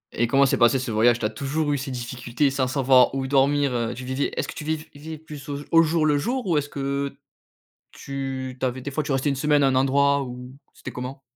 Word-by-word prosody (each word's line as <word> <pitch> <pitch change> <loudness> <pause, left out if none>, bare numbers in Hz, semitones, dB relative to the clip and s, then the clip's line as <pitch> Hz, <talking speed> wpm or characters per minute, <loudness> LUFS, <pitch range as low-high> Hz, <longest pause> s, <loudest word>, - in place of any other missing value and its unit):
Et 120 - +1
comment 135 +3 +4
s'est - - +1
passé 120 +2 +4
ce 130 -2 -4
voyage? 115 +2 +3
Tu 115 - -2
as - - +1
toujours 145 +6 -2
eu 145 - +1
ces 135 +1 -5
difficultés 125 +2 -2
sans 130 -1 0
savoir 130 -1 +4
où 135 - -2
dormir? 135 -3 +2
Tu 130 - -8
vivais 130 +2 -1
est-ce - - -1
que - - -6
tu - - -7
viv 155 0 -3
vivais 155 +2 -8
plus 150 -2 -11
au 145 +3 +2
jour 160 0 +1
le 150 -1 +3
jour? 245 - -2
Ou 170 -4 +2
est-ce 145 0 -1
que 140 0 -3 0.7
tu 135 -2 -5
tu 130 - 0
avais 130 +1 -3
des 140 - -5
fois 155 +2 -1
tu 150 - -4
restais 135 +2 +1
une 140 - 0
semaine 145 +1 +2
à 135 - +5
un 130 - +2
endroit 140 +2 +3
où 125 0 -8 0.2
c'était - - -9
comment? 130 +2 -7
135 Hz, 245 wpm, -24 LUFS, 130-145 Hz, 0.7 s, à